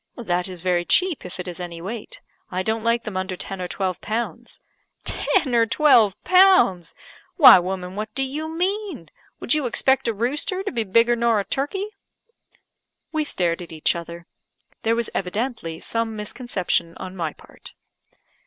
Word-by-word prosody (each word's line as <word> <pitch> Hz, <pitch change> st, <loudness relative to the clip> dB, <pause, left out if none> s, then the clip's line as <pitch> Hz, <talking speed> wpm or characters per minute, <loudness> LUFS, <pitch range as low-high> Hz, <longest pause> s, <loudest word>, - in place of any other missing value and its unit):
"That 180 Hz, -6 st, -1 dB
is 180 Hz, -2 st, -8 dB
very 180 Hz, -1 st, +1 dB
cheap, 360 Hz, -, +2 dB
if 180 Hz, -, -10 dB
it 180 Hz, -, -5 dB
is 180 Hz, 0 st, -6 dB
any 175 Hz, -2 st, -6 dB
weight. 205 Hz, +6 st, -7 dB, 0.3 s
I 185 Hz, -1 st, -2 dB
don't 220 Hz, +2 st, -1 dB
like 230 Hz, 0 st, +1 dB
them 215 Hz, -, -6 dB
under 185 Hz, 0 st, -2 dB
ten 195 Hz, 0 st, -6 dB
or 180 Hz, -, -3 dB
twelve 185 Hz, 0 st, -3 dB
pounds." 230 Hz, +2 st, -4 dB, 0.4 s
"Ten 260 Hz, -5 st, 0 dB
or 230 Hz, -1 st, +4 dB
twelve 230 Hz, -7 st, +4 dB
pounds! 365 Hz, -, +4 dB, 0.4 s
Why, 280 Hz, -, +10 dB
woman, 180 Hz, 0 st, -4 dB
what 215 Hz, +1 st, -4 dB
do 270 Hz, -, 0 dB
you 300 Hz, +4 st, -4 dB
mean? 360 Hz, -, -3 dB, 0.3 s
Would -, -, 0 dB
you 300 Hz, -4 st, +1 dB
expect 265 Hz, +2 st, +2 dB
a 230 Hz, -, +1 dB
rooster 295 Hz, -, -1 dB
to 405 Hz, -, -3 dB
be 230 Hz, -4 st, -1 dB
bigger 230 Hz, +4 st, +4 dB
nor 235 Hz, -2 st, +2 dB
a 200 Hz, -, -3 dB
turkey?" 290 Hz, +9 st, -2 dB, 1.3 s
We 315 Hz, -1 st, 0 dB
stared 175 Hz, -, 0 dB
at 170 Hz, -, -9 dB
each 160 Hz, +1 st, +1 dB
other. 170 Hz, 0 st, -8 dB, 0.6 s
There 225 Hz, +1 st, +1 dB
was 235 Hz, -1 st, -1 dB
evidently 195 Hz, -4 st, -3 dB
some 230 Hz, -1 st, -2 dB
misconception 210 Hz, -6 st, -2 dB
on 185 Hz, 0 st, -8 dB
my 165 Hz, -4 st, -3 dB
part. -, -, -14 dB
220 Hz, 170 wpm, -23 LUFS, 180-265 Hz, 1.3 s, Why